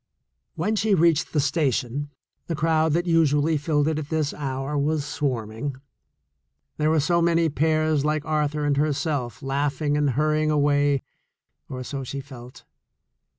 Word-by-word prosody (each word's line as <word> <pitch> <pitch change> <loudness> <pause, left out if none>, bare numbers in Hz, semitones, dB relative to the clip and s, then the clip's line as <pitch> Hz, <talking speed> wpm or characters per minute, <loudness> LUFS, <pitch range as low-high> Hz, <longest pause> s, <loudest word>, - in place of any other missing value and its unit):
When 220 - 0
she 210 -1 +2
reached 165 -3 +2
the 155 - +1
station, 140 -1 0 0.4
the 165 - -2
crowd 160 0 +2
that 175 +2 +1
usually 160 -2 +3
filled 150 0 +1
it 155 -1 0
at 150 -1 -7
this 155 -3 -1
hour 135 0 -4
was 145 +1 0
swarming. 125 -2 -3 1.0
There 155 0 +1
were 160 0 +3
so 170 +4 +2
many 165 -1 +3
pairs 155 0 +1
like 150 0 0
Arthur 150 -1 0
and 145 -1 +1
herself 145 -4 -1
laughing 140 +2 -1
and 150 -1 +2
hur 155 +1 +2
rying 155 0 +1
away 145 -2 +2 0.7
or 130 -1 -5
so 135 +1 -5
she 140 +2 -5
felt. 130 -2 -11
150 Hz, 150 wpm, -24 LUFS, 140-155 Hz, 1.0 s, usually